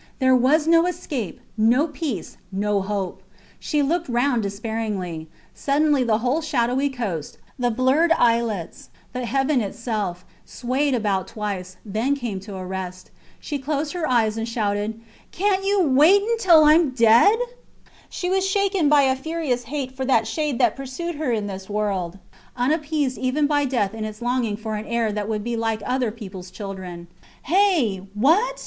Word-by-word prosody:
There 260 -1 +4
was 280 +5 +3
no 330 +1 +4
escape, 270 - -4 0.2
no 235 +7 +3
peace, 295 - -5 0.2
no 200 +1 0
hope. 195 -1 -3 0.4
She 295 -2 0
looked 335 +2 -1
round 245 0 +1
despairingly. 200 -5 -4 0.3
Suddenly 290 -1 +2
the 225 -3 +2
whole 275 +6 +1
shadowy 265 -2 +1
coast, 205 - -4 0.2
the 245 -1 +2
blurred 260 +8 +2
islets, 230 - 0 0.2
the 250 -1 -3
heaven 270 0 +1
itself, 205 -4 -3 0.2
swayed 265 +3 -1
about 205 -5 0
twice, 195 -4 -5
then 220 +7 0
came 235 -8 -4
to 200 +1 -9
a 185 -1 -6
rest. 185 -1 -6 0.3
She 290 -2 -4
closed 290 +2 -2
her 345 -5 -2
eyes 225 -3 +2
and 225 +1 -3
shouted 215 -1 -2 0.3
Cant 390 +1 +1
you 400 -1 +3
wait 310 +10 +5 0.2
till 340 -7 +6
I 300 0 +7
am 325 -2 +4
dead! 245 - +5 0.7
She 360 - -4
was 380 +1 +1
shaken 390 -4 +1
by 295 -1 +5
a 260 -1 +3
furious 270 -4 -2
hate 265 +1 -4
for 265 0 -5
that 265 - +3
shade 300 -5 -2
that 240 -4 +3
pursued 275 +6 -5
her 295 -4 -1
in 215 -3 -1
this 195 -1 -7
world, 195 -4 -2 0.4
unappeased 295 0 0
even 260 +3 +1
by 290 -1 +2
death 235 -7 0
in 220 -1 -5
its 215 0 -6
longing 240 -3 -1
for 220 0 -5
an 210 - -6
heir 230 -1 0
that 210 0 -3
would 215 -2 -2
be 235 +1 -2
like 225 -2 -1
other 250 -2 0
peoples 190 -5 -9
children. 185 -3 -7 0.4
Hey! 335 - +2 0.2
What? 395 - +3
245 Hz, 165 wpm, -23 LUFS, 210-295 Hz, 0.7 s, I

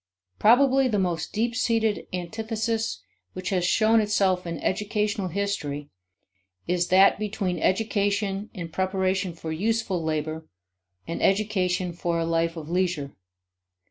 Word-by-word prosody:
Probably 265 +4 +5
the 220 -4 0
most 180 -4 -1
deep 230 +2 -1
seated 225 -3 +1
antithesis 225 +5 -2 0.3
which 185 0 -4
has 185 -2 +1
shown 220 +5 +4
itself 195 -4 +1
in 170 -1 -3
educational 210 +2 -1
history 160 -7 -3 0.7
is 175 0 0
that 190 +2 +5
between 200 -4 -2
education 200 +1 0
in 170 -4 -6
preparation 190 0 -1
for 165 -1 -6
useful 200 0 -1
labor 155 0 -3 0.6
and 165 - -4
education 190 -3 +1
for 170 0 -1
a 165 - 0
life 165 0 0
of 155 -2 -7
leisure. 175 -5 -1
190 Hz, 125 wpm, -25 LUFS, 170-215 Hz, 0.7 s, Probably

